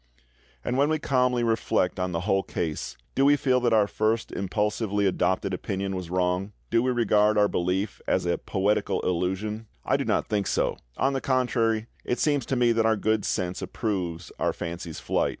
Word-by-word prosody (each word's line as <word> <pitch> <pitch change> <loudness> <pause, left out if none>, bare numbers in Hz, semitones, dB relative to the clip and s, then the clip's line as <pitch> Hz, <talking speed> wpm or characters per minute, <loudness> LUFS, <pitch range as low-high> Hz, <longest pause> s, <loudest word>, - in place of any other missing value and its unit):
And 125 - 0
when 145 +2 +4
we 155 - +2
calmly 125 -5 +1
reflect 110 -5 +1
on 90 0 -1
the 85 -1 -2
whole 95 0 +2
case, 80 -5 -4 0.2
do 135 - +2
we 145 +1 +6
feel 130 -2 +2
that 120 -1 +1
our 110 -2 +5
first 110 +2 0
impulsively 105 +1 -1
adopted 95 0 +1
opinion 95 +1 -3
was 90 -2 -5
wrong? 90 +2 0 0.2
Do 115 - +4
we 130 - +1
regard 110 -3 +3
our 105 0 +5
belief 95 +3 -1
as - - +1
a 85 - 0
poetical 100 +2 0
illusion? 95 +5 -2 0.2
I - - +2
do - - -1
not - - +1
think 105 -3 0
so; - - 0 0.2
on 135 +1 +2
the 135 - -1
contrary, 115 -4 +1 0.2
it 125 - -1
seems 145 -5 +1
to 135 - 0
me 120 -1 +3
that 115 -1 +2
our 110 -1 +3
good 110 0 +1
sense 90 0 -2
approves 90 -6 -3
our - - +1
fancy's 85 -1 -6
flight. - - 0
105 Hz, 190 wpm, -26 LUFS, 95-120 Hz, 0.2 s, we